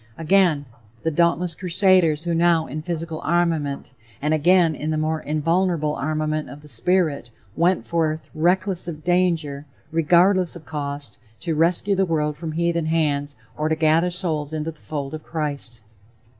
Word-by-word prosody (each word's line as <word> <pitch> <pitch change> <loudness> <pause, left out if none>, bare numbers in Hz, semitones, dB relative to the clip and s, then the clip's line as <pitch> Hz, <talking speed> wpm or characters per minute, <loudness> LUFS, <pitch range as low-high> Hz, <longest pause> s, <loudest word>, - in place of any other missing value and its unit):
Again: 165 -3 +3 0.4
"The 160 - 0
dauntless 170 +2 +2
crusaders 180 -2 +3
who 170 -1 -1
now 165 -1 +3
in 155 +3 -5
physical 165 -1 -4
armament 160 -6 0 0.3
and 150 +2 0
again 170 +1 +4
in 150 +1 -4
the 155 - 0
more 155 0 -1
invulnerable 160 0 0
armament 155 0 -2
of 145 +3 -11
the - - -13
spirit, 150 +1 +1 0.3
went 175 +3 +2
forth, 160 -2 -1
reckless 180 +3 +1
of 155 -3 -6
danger, 170 -5 0 0.2
regardless 175 +3 +3
of 165 -3 -11
cost, 145 -2 -6 0.2
to 170 -1 -1
rescue 170 +5 +2
the 195 -1 +1
world 150 -2 0
from 160 0 -6
heathen 170 0 0
hands 145 -3 0 0.2
or 155 +1 -1
to 160 - +2
gather 160 +2 +3
souls 160 -5 -2
into 155 +1 -3
the 155 - -21
fold 145 -2 -5
of 155 - -5
Christ." 145 -8 -5
160 Hz, 155 wpm, -22 LUFS, 150-175 Hz, 0.4 s, again